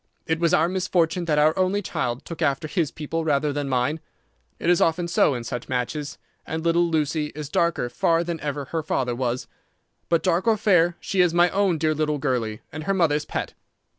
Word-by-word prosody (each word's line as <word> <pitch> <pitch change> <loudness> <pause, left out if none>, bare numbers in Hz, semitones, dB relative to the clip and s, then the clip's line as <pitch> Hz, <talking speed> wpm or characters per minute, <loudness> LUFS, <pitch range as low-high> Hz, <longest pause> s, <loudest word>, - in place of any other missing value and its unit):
It 160 0 0
was 170 -1 +2
our 170 -2 +4
misfortune 180 -2 0
that 155 -3 +1
our 155 +1 +4
only 190 +2 +1
child 125 -5 -3
took 165 0 -8
after 140 0 0
his 165 -2 0
people 160 +1 -4
rather 145 -1 +1
than 145 -1 -2
mine. 130 +5 0 0.6
It - - -4
is 175 0 +4
often 170 +1 +2
so 165 -4 +3
in 120 - -4
such 120 0 -5
matches, 130 +4 -3 0.3
and 160 +1 -4
little 170 +1 +3
Lucy 155 -1 0
is 150 -2 -6
darker 170 -6 +1
far 165 +7 +1
than 170 -1 -4
ever 145 -1 -3
her 165 +4 -3
father 130 -5 -1
was. 125 0 -2 0.6
But 170 -1 +2
dark 180 +2 +1
or 225 -1 +4
fair, 175 -5 +3
she 190 - 0
is 175 -2 +2
my 175 0 +4
own 195 -4 +2
dear 155 0 +1
little 150 -1 0
girlie, 125 -6 -2
and 155 +1 -7
her 195 +1 +1
mother's 150 -5 +2
pet." - - -4
160 Hz, 205 wpm, -24 LUFS, 145-170 Hz, 0.6 s, our